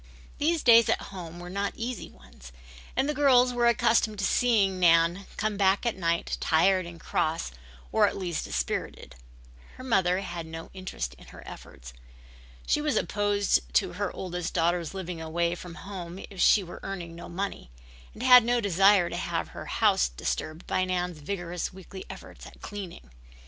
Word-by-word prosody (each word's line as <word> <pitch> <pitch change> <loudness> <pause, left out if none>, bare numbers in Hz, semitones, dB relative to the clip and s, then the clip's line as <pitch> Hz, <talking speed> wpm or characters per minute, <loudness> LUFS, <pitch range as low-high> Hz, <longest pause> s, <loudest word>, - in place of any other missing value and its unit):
These 320 +2 +1
days 230 -1 +7
at - - +2
home 175 -2 -8
were 175 - -8
not 200 +1 -2
easy 240 +1 -5
ones, - - -16 0.4
and 270 - +1
the 300 - 0
girls 255 -4 +4
were 240 -1 +2
accustomed 230 -2 +2
to 195 - -1
seeing 200 -7 +2
Nan 170 +2 +4
come 215 -1 -1
back 195 +2 +2
at 235 - 0
night 170 -2 -1
tired 185 +2 +3
and 170 -1 -10
cross 160 - -1 0.4
or - - +4
at - - -3
least 175 -4 -3
dispirited. - - -3 0.6
Her 255 - -10
mother 190 -7 +2
had 170 -4 -6
no 165 0 -8
interest 185 - -5
in - - -15
her - - -13
efforts. - - -11 0.7
She 300 - +1
was 300 -1 0
opposed 205 -1 +1 0.2
to - - +2
her - - -2
oldest 180 -2 -5
daughter's 170 +1 0
living 180 -3 -5
away 170 +2 -1
from 175 -1 -9
home 180 -2 -8
if 190 -3 -5
she 205 - +5
were 175 - -9
earning 175 -4 -6
no 170 - -10
money, 190 - -4 0.5
and 230 - -7
had 250 -2 +9
no 240 +1 +2
desire 195 -2 +4
to - - -5
have - - -3
her - - -9
house 60 - +2
disturbed 155 - -4
by 185 - 0
Nan's 180 -3 -2
vigorous 175 +1 -4
weekly 190 +1 -10
efforts - - -10
at - - -15
cleaning. 185 - -8
185 Hz, 175 wpm, -27 LUFS, 170-205 Hz, 0.7 s, had